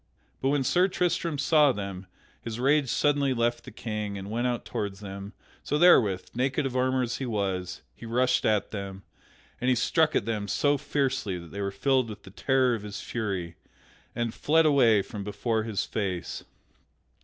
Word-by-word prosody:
But 135 - +2
when 140 -1 +2
Sir 175 +8 +3
Tristram 175 -4 -1
saw 150 0 +4
them, 100 -4 -6 0.3
his 115 0 -5
rage 140 +1 +3
suddenly 140 -1 +2
left 120 0 0
the - - -9
King 105 -3 -4
and 100 +1 -7
went 120 +3 0
out 120 -1 -2
toward 100 -2 -3
them; 100 +1 -8 0.3
so 150 - -1
therewith, 115 - +5
naked 135 +4 0
of 130 -1 -3
armor 130 0 +2
as 120 - -2
he 130 - -4
was, 95 -5 -2
he 115 - -10
rushed 125 +2 +2
at 105 -2 +1
them, 100 -2 -6 0.6
and 125 - +1
he 130 - +4
struck 155 +6 +2
at - - +1
them 105 -3 -2
so 145 +7 +2
fiercely 135 -9 -1
that 85 -2 -11
they 100 - -5
were 100 - -1
filled 130 +5 +1
with 105 - -9
the 95 - -12
terror 130 +3 +2
of 115 - -3
his 105 -1 -7
fury, 95 -8 -4 0.6
and 120 -1 -1
fled 160 +2 +3
away 120 -9 +5
from 105 -1 -7
before 110 +2 -1
his 110 -4 -2
face. 95 -5 -3
115 Hz, 185 wpm, -27 LUFS, 100-135 Hz, 0.6 s, therewith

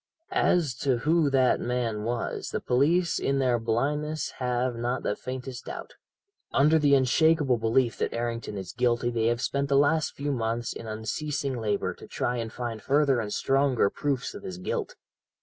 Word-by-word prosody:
"As 175 - +2
to 135 -3 +1
who 155 +4 +2
that 130 -2 +3
man 120 -3 -1
was, 115 +2 -3
the - - -2
police 160 +7 +2
in 140 - 0
their 125 -3 +2
blindness 150 +7 -1
have 125 -1 0
not 120 +2 -2
the 105 - 0
faintest 130 -1 -6
doubt. - - -7 0.6
Under 150 +3 +4
the 145 -2 +5
unshakable 140 0 +3
belief 115 +1 +1
that - - 0
Errington 115 -3 -3
is 95 -2 -6
guilty 120 -1 +1
they 115 -1 +1
have 120 +1 +1
spent 140 +1 -1
the 140 - +4
last 150 +2 +2
few 145 +1 -2
months 115 -2 -2
in 115 - -8
unceasing 130 +6 -3
labour 105 -4 -1
to - - -13
try 120 0 -2
and 115 -1 -4
find 115 -3 -5
further 140 +1 +3
and 105 -3 -3
stronger 135 -6 +2
proofs 140 -4 -2
of - - -8
his 90 - -6
guilt. 90 - -3
125 Hz, 175 wpm, -27 LUFS, 115-140 Hz, 0.6 s, the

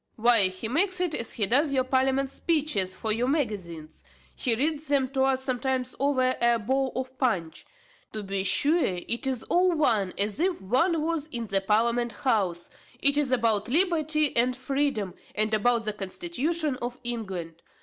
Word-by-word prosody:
"Why 230 -3 +4
he 185 +4 -5
makes 365 - +1
it, 360 -3 -1
as 230 -4 -3
he 210 - +1
doth 280 +9 +2
your 265 -2 +2
parliament 265 +1 +1
speeches 280 - 0
for 220 +3 -2
your 235 +3 0
magazines. 190 - -3 0.3
He 240 -4 +1
reads 300 +4 -1
them 275 -2 +2
to 265 0 +1
us 265 -1 0
sometimes 260 -1 -2
over 260 -2 +2
a 235 0 +4
bowl 260 +4 0
of 260 0 -4
punch. 190 - -1 0.5
To 215 -1 -4
be 195 -1 -2
sure 305 - +3
it 190 +8 -2
is 255 -4 -2
all 360 0 +2
one 225 - +1
as 205 +3 0
if 360 +1 +1
one 300 - +1
was 320 -2 -2
in 235 -6 -4
the 195 -2 +1
parliament 235 +3 +1
house 195 -8 -1 0.3
it 280 +2 +3
is 290 -3 +1
about 225 -4 +1
liberty 310 -2 +1
and 245 +2 +2
freedom, 270 -8 -1 0.2
and 215 +1 +1
about 230 +2 +2
the 215 - -1
constitution 305 - -2
of 245 +1 -4
England. 190 -9 -4
250 Hz, 170 wpm, -27 LUFS, 215-285 Hz, 0.5 s, Why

